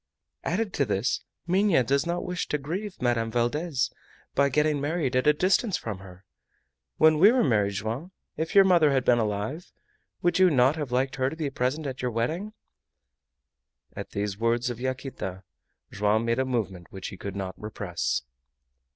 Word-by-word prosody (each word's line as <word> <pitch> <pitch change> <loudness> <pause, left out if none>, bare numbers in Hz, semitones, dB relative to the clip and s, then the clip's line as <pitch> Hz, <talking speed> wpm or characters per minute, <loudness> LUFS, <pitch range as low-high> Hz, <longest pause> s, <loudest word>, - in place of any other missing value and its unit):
Added 200 +3 -1
to 140 - +1
this, 105 +2 0 0.2
Minha 185 -5 +3
does 140 +6 +1
not 175 +1 -2
wish 180 0 -3
to 150 - 0
grieve 185 +8 -5
Madame 115 -2 +1
Valdez 130 +5 0 0.4
by 140 0 +3
getting 150 +1 +1
married 145 -3 -1
at 130 +3 +2
a - - +8
distance 190 +6 +2
from 105 -4 -5
her. 95 0 -14 0.7
When 155 -1 +5
we 200 +6 +8
were 255 0 +3
married, 105 -7 +2
Joam, 115 - -4 0.2
if 160 +3 -3
your 195 - +9
mother 175 -5 +5
had 130 -2 +1
been 120 -1 +4
alive, 110 - -3 0.5
would 175 +2 +2
you 185 -1 +7
not 135 -1 +4
have 150 -6 -4
liked 130 +2 0
her 130 0 +1
to 155 - -7
be 155 -4 -3
present 135 +4 -1
at 130 -1 -4
your 125 - 0
wedding?" 160 - -2 1.4
At - - -6
these 100 0 -3
words 120 +2 +1
of 120 - -7
Yaquita 130 -7 -4 0.5
Joam 105 +3 +1
made 115 +2 +1
a 130 - +2
movement 100 -9 -3
which 95 -1 -6
he - - -9
could 100 +1 -6
not 95 -2 -4
repress. 90 -11 -3
130 Hz, 175 wpm, -27 LUFS, 110-160 Hz, 1.4 s, your